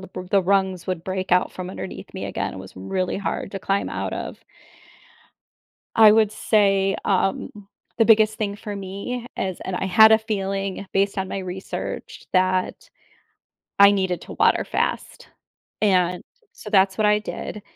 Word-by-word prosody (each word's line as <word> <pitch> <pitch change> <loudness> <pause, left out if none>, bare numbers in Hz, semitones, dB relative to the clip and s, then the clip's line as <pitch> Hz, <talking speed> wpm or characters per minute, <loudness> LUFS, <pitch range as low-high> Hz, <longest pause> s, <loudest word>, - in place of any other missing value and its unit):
b 185 - -8
the 195 -2 +3
rungs 190 -1 0
would 180 -3 -3
break 190 0 -3
out 180 0 +3
from 185 -1 -6
underneath - - -8
me - - -5
again; - - -3
it - - -8
was - - -11
really 180 - -3
hard 200 - -3
to 195 - -4
climb 195 +1 -1
out - - -3
of. - - -6 1.6
I 215 -2 +8
would 215 -1 +3
say, 195 -3 +2
um, 195 -1 0 0.5
the 225 - +4
biggest 220 -1 +5
thing 205 -2 -2
for 205 0 -7
me 200 +6 -5
is, 185 -2 -3
and 190 - -3
I 190 - -2
had 220 +4 +7
a 220 - +7
feeling, 195 -3 -3
based 195 +1 +1
on 190 0 -1
my 195 - -4
research, 185 +1 -6
that 185 0 0 0.9
I 200 0 +9
needed 190 -3 0
to - - -10
water - - +3
fast, - - -3 0.5
and 180 -3 +2 0.3
so 210 - -10
that's 190 -2 +3
what 215 - +3
I 210 0 +4
did. 210 -1 -6
195 Hz, 165 wpm, -23 LUFS, 185-210 Hz, 1.6 s, I